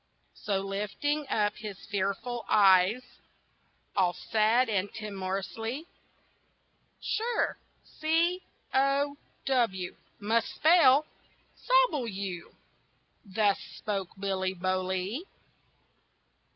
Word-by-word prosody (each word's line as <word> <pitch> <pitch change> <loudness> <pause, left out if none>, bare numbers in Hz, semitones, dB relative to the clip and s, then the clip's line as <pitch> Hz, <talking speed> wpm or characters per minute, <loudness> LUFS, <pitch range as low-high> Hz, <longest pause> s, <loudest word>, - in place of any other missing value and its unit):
So, 195 -2 -2
lifting 210 +10 -2
up 210 -1 +1
his 210 -3 -7
fearful 205 +5 -2
eyes 195 +3 +5 0.9
All 180 -3 +3
sad 220 +7 +2
and 205 -2 -1
timorously, 215 - -4 1.1
"Sure, 465 +3 -1 0.2
C 335 +4 0 0.3
O 275 +1 +2 0.3
W, 225 -9 0 0.2
must 225 +2 0
spell, 310 -3 +6 0.5
Sobble - - +2
you!" 195 -4 -5 0.7
Thus 205 -1 +1 0.2
spoke 195 -4 -3
Billy 190 -1 -1
Bolee. 185 - -2
210 Hz, 80 wpm, -29 LUFS, 190-270 Hz, 1.1 s, spell